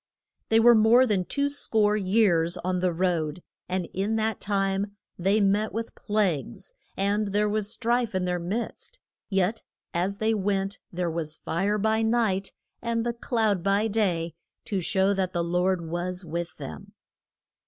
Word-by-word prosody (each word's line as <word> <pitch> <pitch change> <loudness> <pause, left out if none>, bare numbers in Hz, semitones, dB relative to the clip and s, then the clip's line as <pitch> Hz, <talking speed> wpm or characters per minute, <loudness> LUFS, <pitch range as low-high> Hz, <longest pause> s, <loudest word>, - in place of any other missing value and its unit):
They 225 - +5
were 240 +1 +8
more 230 +3 +6
than 200 -6 +1
two 280 +7 0
score 220 -7 +1
years 185 -4 +2
on 180 +1 -1
the 180 0 +1
road, 170 -2 -1 0.3
and 180 -2 -1
in 200 +4 0
that 220 0 -1
time 200 0 -1 0.2
they 195 +4 +3
met 205 +2 +2
with 225 +1 -4
plagues, 205 - -1 0.2
and 205 +2 +1
there 205 +1 +1
was 210 -1 0
strife 235 -2 0
in 185 -1 0
their 180 0 -1
midst, 220 - -4 0.3
yet 195 +2 +1 0.3
as 185 +4 -1
they 220 +1 +1
went 195 -1 -1
there 175 -1 -1
was 160 -2 -3
the - - -33
fire 200 +5 0
by 220 +1 +1
night 220 -4 +1 0.3
and 230 -1 -1
the 240 - 0
cloud 225 -5 0
by 200 +4 +2
day 180 -7 0 0.3
to 195 -3 -1
show 190 +3 +2
that 190 -2 -1
the 170 -1 0
Lord 180 +1 +1
was 180 +2 -3
with 170 0 -4
them. 75 -4 -8
195 Hz, 165 wpm, -26 LUFS, 180-220 Hz, 0.3 s, were